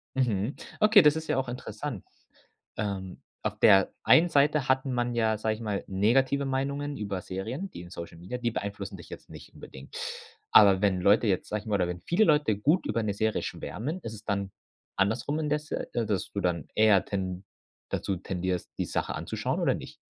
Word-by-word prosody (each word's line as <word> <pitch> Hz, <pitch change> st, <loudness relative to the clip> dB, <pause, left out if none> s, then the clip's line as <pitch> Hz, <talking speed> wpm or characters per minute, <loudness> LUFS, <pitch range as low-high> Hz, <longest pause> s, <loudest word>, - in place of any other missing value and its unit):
Mhm. 120 Hz, -1 st, 0 dB, 0.2 s
Okay, 215 Hz, -1 st, +7 dB
das 150 Hz, -2 st, +5 dB
ist 160 Hz, 0 st, -4 dB
ja 150 Hz, -3 st, 0 dB
auch 135 Hz, -, -1 dB
interessant. 120 Hz, -2 st, -6 dB, 0.7 s
Ähm, 95 Hz, -3 st, -4 dB, 0.2 s
auf -, -, -3 dB
der 95 Hz, 0 st, +6 dB
einen 170 Hz, +2 st, +6 dB
Seite 145 Hz, -1 st, +3 dB
hat 130 Hz, +1 st, +2 dB
man 120 Hz, -2 st, -1 dB
ja, 110 Hz, -2 st, +1 dB
sage 110 Hz, 0 st, -1 dB
ich 110 Hz, -, -11 dB
mal, 105 Hz, -3 st, -2 dB
negative 130 Hz, +8 st, +2 dB
Meinungen 140 Hz, +2 st, -2 dB
über 100 Hz, -3 st, -3 dB
Serien. 125 Hz, -, -5 dB
Die -, -, -8 dB
in 85 Hz, -, -11 dB
Social 85 Hz, -1 st, -8 dB
Media, 90 Hz, +9 st, -6 dB
die 120 Hz, -1 st, -1 dB
beeinflussen 100 Hz, -2 st, -5 dB
dich 85 Hz, -, -13 dB
jetzt -, -, -10 dB
nicht -, -, -12 dB
unbedingt. 65 Hz, +1 st, -12 dB, 0.6 s
Aber 100 Hz, -3 st, +7 dB
wenn 95 Hz, -3 st, +2 dB
Leute 105 Hz, +5 st, +4 dB
jetzt, 95 Hz, -3 st, 0 dB
sage 105 Hz, 0 st, -2 dB
ich -, -, -20 dB
mal 105 Hz, -, +1 dB
oder 90 Hz, -3 st, +1 dB
wenn 90 Hz, 0 st, -5 dB
viele 175 Hz, -, +2 dB
Leute 150 Hz, -, +3 dB
gut 150 Hz, -, +2 dB
über 110 Hz, +2 st, 0 dB
'ne 105 Hz, -2 st, -1 dB
Serie 110 Hz, +2 st, 0 dB
schwärmen, 150 Hz, -, -5 dB
ist 115 Hz, -, -6 dB
es 105 Hz, 0 st, -11 dB
dann 100 Hz, -2 st, -2 dB, 0.4 s
andersrum 110 Hz, +10 st, 0 dB
indes 150 Hz, 0 st, -2 dB
äh, -, -, -2 dB, 0.2 s
dass 100 Hz, -3 st, -2 dB
du 100 Hz, -, -3 dB
dann 85 Hz, -5 st, -1 dB
eher 105 Hz, -3 st, +5 dB
ten 95 Hz, -2 st, -3 dB, 0.5 s
dazu 95 Hz, -, -2 dB
tendierst, 90 Hz, 0 st, -3 dB
die -, -, -1 dB
Sache -, -, -2 dB
anzuschauen, -, -, -3 dB
oder -, -, +3 dB
nicht? -, -, -9 dB
110 Hz, 195 wpm, -28 LUFS, 95-135 Hz, 0.7 s, Okay